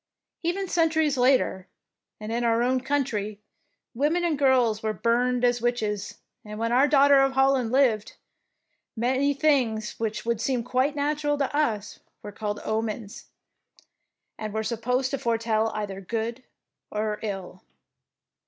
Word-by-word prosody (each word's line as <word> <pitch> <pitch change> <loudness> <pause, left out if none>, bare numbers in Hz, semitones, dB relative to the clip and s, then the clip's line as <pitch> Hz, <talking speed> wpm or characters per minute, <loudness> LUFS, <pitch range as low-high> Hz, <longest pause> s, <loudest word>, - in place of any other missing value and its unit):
Even 365 +3 -1
centuries 320 -4 +2
later, 250 -7 +2 0.5
and 215 +1 -6
in 235 +1 -1
our 230 0 +2
own 255 +1 +1
country, 240 -7 -2 0.5
women 300 +8 +1
and 330 -3 +1
girls 250 -6 +3
were 220 0 -1
burned 245 +2 +1
as 240 -1 +2
witches, 215 -4 -2 0.3
and 210 0 -8
when 230 +1 -1
our 260 +4 +4
Daughter 280 -1 +6
of 270 0 +2
Holland 265 -3 +2
lived, 245 -6 +2 0.8
many 260 +5 +1
things 250 -7 +1
which 220 -1 -3
would 235 -2 -1
seem 250 -1 0
quite 255 +4 0
natural 290 0 0
to 285 0 -1
us 220 -9 -1 0.2
were 205 - -7
called 205 0 -4
omens,'' 220 -1 -4 1.1
and 215 -1 -5
were 220 - 0
supposed 250 +4 -1
to 275 - -2
foretell 225 -1 0
either 200 -2 -4
good 230 +5 -4 0.5
or 210 0 -2
ill. 195 -3 -6
240 Hz, 140 wpm, -26 LUFS, 220-275 Hz, 1.1 s, Daughter